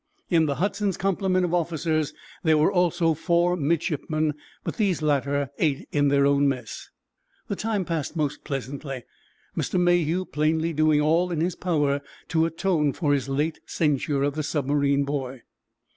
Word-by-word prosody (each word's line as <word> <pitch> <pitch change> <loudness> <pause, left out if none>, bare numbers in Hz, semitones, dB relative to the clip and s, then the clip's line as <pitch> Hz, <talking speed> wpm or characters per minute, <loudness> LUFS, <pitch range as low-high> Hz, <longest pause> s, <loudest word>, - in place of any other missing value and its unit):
In 165 -2 +4
the 140 - 0
"Hudson's" 200 +1 -1
complement 190 -1 +1
of 175 - -3
officers 160 -3 0 0.3
there 160 -3 +3
were 150 - +3
also 175 -2 +2
four 170 +3 +2
midshipmen, 155 -1 0 0.3
but - - -4
these 195 -8 +1
latter 140 -1 0
ate 145 -4 0
in 145 -1 +2
their 140 0 +3
own 140 0 +4
mess. 125 -5 -5 0.6
The 200 - -1
time 210 -2 -1
passed 160 -2 -3
most 150 -3 -2
pleasantly, 135 -1 -5 0.5
Mr. 180 - 0
Mayhew 175 0 +2
plainly 160 +2 0
doing 155 -1 +3
all 165 +4 +2
in 165 - -1
his 170 +2 0
power 145 -5 0 0.3
to 160 0 +2
atone 165 -4 0
for 150 -5 +1
his 140 -1 -1
late 150 +4 -1
censure 145 -2 0
of 145 0 +1
the 155 - -2
submarine 140 -1 +1
boy. 135 -3 -4
155 Hz, 160 wpm, -25 LUFS, 140-175 Hz, 0.6 s, In